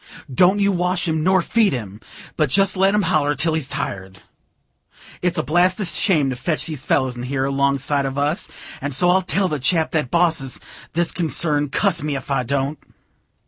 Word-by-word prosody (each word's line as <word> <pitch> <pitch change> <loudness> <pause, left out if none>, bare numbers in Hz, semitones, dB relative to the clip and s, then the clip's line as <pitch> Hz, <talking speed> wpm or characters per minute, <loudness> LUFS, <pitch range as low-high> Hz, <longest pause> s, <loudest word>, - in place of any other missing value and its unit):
Don't 185 +8 +4
you 200 0 +2
wash 180 0 0
him, 160 -1 0
nor 185 0 +3
feed 220 -1 +2
him, 105 -4 -6 0.3
but 155 -3 +1
jest 195 +7 +2
let 195 +2 +3
him 210 - +2
holler 155 -4 +1
till 160 +3 +1
he's 155 -4 -2
tired. 95 -6 -5 1.0
It's 180 -1 0
a 155 - 0
blasted 180 +5 +2
shame 155 -6 +1
to - - -3
fetch 155 +5 -2
them 160 - -5
fellers 130 -1 0
in 120 - -7
here, 130 +2 -2
along 140 0 +1
side 140 +1 0
of 135 +1 -5
us; 145 +5 0 0.3
and 140 -1 -2
so 175 +6 +4
I'll 190 +1 +3
tell 190 +1 0
the 150 -4 -3
chap 160 +5 +2
that 150 -6 -1
bosses 165 -5 +1 0.3
this 170 +1 0
concern; 150 -3 0
cuss 185 +3 +1
me 150 -1 -2
if 135 +1 -6
I 135 - +1
don't." 140 +3 -2
155 Hz, 195 wpm, -20 LUFS, 135-180 Hz, 1.0 s, Don't